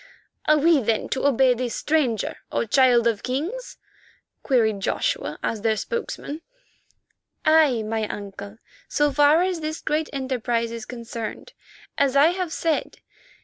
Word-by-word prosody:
"Are 305 - +5
we 315 +1 +4
then, 225 -1 -1
to 270 +1 0
obey 265 -1 +4
this 245 -1 -3
stranger, 275 -9 0
O - - 0
Child 245 0 +4
of 225 -3 +1
Kings?" 330 - -4 0.6
queried 220 -6 +2
Joshua - - -1
as 220 - -2
their 220 0 +1
spokesman. 380 - -4 1.0
"Aye, 310 -7 +4
my 220 0 -2
uncle, 200 +1 -8 0.3
so 295 0 +1
far 295 +4 +4
as 365 -2 -1
this 310 0 -4
great 310 +1 -1
enterprise 245 -4 -2
is 230 -1 -6
concerned, 235 - -7 0.5
as 280 -1 +2
I 285 +3 +6
have 360 -2 -3
said. 325 -2 -2
265 Hz, 140 wpm, -23 LUFS, 230-310 Hz, 1.0 s, I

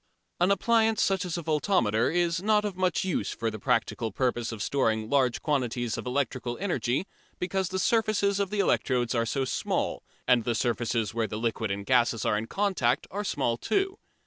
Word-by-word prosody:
An 175 +2 +3
appliance 225 +1 +3
such 195 -1 +1
as 175 -1 -3
a 170 - -4
voltameter 150 - +2
is 175 0 +1
not 210 +1 +2
of 205 -3 -3
much 185 -1 +1
use 190 -2 -1
for 115 -1 -2
the 110 - -7
practical 115 -1 0
purpose 120 0 -1
of 110 -3 -4
storing 110 -5 0
large 130 -4 +2
quantities 125 -5 -1
of - - -6
electrical 125 -2 -2
energy, 175 -6 -1 0.3
because 185 0 -1
the 190 - -3
surfaces 205 -1 +2
of 200 -1 0
the 210 0 -3
electrodes 125 -9 +1
are 115 -1 +1
so 135 +2 0
small - - -1 0.3
and 125 -2 +4
the 120 -1 0
surfaces 115 -2 0
where 115 -1 0
liquid 110 +1 -2
and 100 0 -3
gases 120 -2 +2
are - - +2
in 110 +2 -2
contact 190 - 0
are 205 +2 -3
small 125 - 0
too. 390 - -1
130 Hz, 185 wpm, -28 LUFS, 115-190 Hz, 0.3 s, and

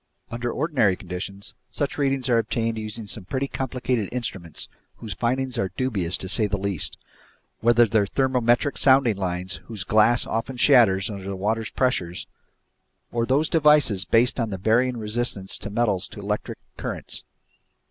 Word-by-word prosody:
Under 120 +1 -2
ordinary 135 - +2
conditions, 95 +3 -7 0.2
such 145 0 -3
readings 135 -2 +1
are 120 -2 +4
obtained 115 +1 -1
using 110 0 -5
some 105 0 -2
pretty 135 +7 -2
complicated 125 -5 -2
instruments 95 -9 -4 0.3
whose 110 -3 -7
findings 125 +3 -1
are 95 - 0
dubious 100 -10 0
to 95 - -5
say 105 +2 +2
the 100 0 -1
least, 95 -4 -3 0.6
whether 120 +1 +5
they're 105 -2 +2
thermometric 125 +2 +1
sounding 130 -5 +5
lines, 90 -1 -3
whose 110 -4 -5
glass 110 +3 +3
often 115 +3 -3
shatters 110 -7 +5
under 100 -2 -7
the 100 0 -4
water's 110 +4 -1
pressure, 90 -10 0 1.0
or 115 0 -1
those 145 +4 +2
devices 150 - +4
based 115 +4 +3
on 115 -2 0
the 95 - -4
varying 120 +6 +2
resistance 105 -3 -3
of 105 - -5
metals 105 -4 0
to - - -11
electric - - -3 0.2
currents. - - -5
115 Hz, 155 wpm, -24 LUFS, 100-125 Hz, 1.0 s, whether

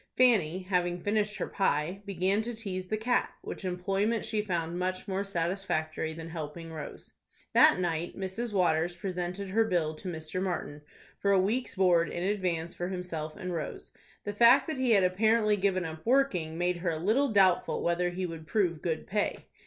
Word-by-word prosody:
Fanny, 190 -9 +4
having 180 -1 0
finished 210 +2 0
her - - -2
pie, 175 +1 0
began 195 +2 +1
to 235 +1 -5
tease 185 -4 -5
the 215 - -1
cat, 245 +3 0
which - - -7
employment 195 +5 0
she 215 -2 0
found 175 -4 -2
much 185 0 -2
more 195 0 -1
satisfactory 170 -4 -2
than 165 +1 -8
helping 165 0 -6
Rose. 155 - -8 0.4
That - - +7
night 170 -1 -2
Mrs. 195 +5 -3
Waters 175 -3 +2
presented 180 +1 -4
her 225 +4 +3
bill 175 -7 0
to 160 - -9
Mr. 160 +2 -4
Martin 170 -6 -3 0.4
for 200 - 0
a 195 - +5
week's 225 +7 0
board 180 -3 +3
in 175 - -4
advance 180 -4 -1
for 175 - -4
himself 180 -4 -5
and 185 -3 -5
Rose. 165 -2 -5 0.3
The 205 - -4
fact 235 +5 +6
that 315 -3 -3
he 260 -1 +1
had 200 -3 +5
apparently 215 +3 +3
given 190 -2 0
up 160 0 -7
working 215 -11 +1
made 175 0 0
her 175 0 -1
a 160 - -1
little 220 - +2
doubtful 190 -4 +3
whether 175 +1 +1
he 180 +1 -3
would 165 -2 -7
prove 170 -4 +1
good 160 -3 -2
pay. 205 +1 -1
185 Hz, 185 wpm, -29 LUFS, 170-205 Hz, 0.4 s, That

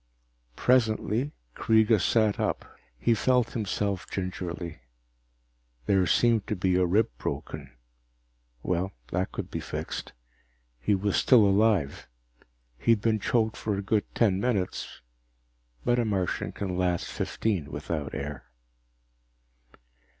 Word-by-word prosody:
Presently 120 +1 +2 0.2
Kreega 110 -2 +4
sat 110 -3 +2
up. - - -1 0.3
He 115 - +2
felt 125 0 +2
himself 100 -3 -2
gingerly. 90 -4 -4 1.1
There 95 +2 +3
seemed 115 +2 +3
to 105 - -1
be 90 -1 +1
a 90 -1 +3
rib 105 +5 +3
broken - - -5 0.9
well, 90 +2 -1 0.2
that 90 +2 -1
could - - -6
be - - -3
fixed. - - -5 0.7
He 100 +11 +2
was 100 +1 0
still 120 -5 +6
alive. 100 -7 +2 0.7
He'd 115 -3 +3
been 110 0 +2
choked 110 +1 +1
for 105 -2 -2
a 100 - -3
good 105 +1 +1
ten 100 -5 +3
minutes, 105 -6 -2 0.8
but 120 0 +3
a - - +3
Martian 95 -5 -1
can 95 -2 -4
last 90 -2 +1
fifteen 100 -9 -2
without 75 -4 -4
air. 70 -2 -5
100 Hz, 120 wpm, -28 LUFS, 90-110 Hz, 1.1 s, still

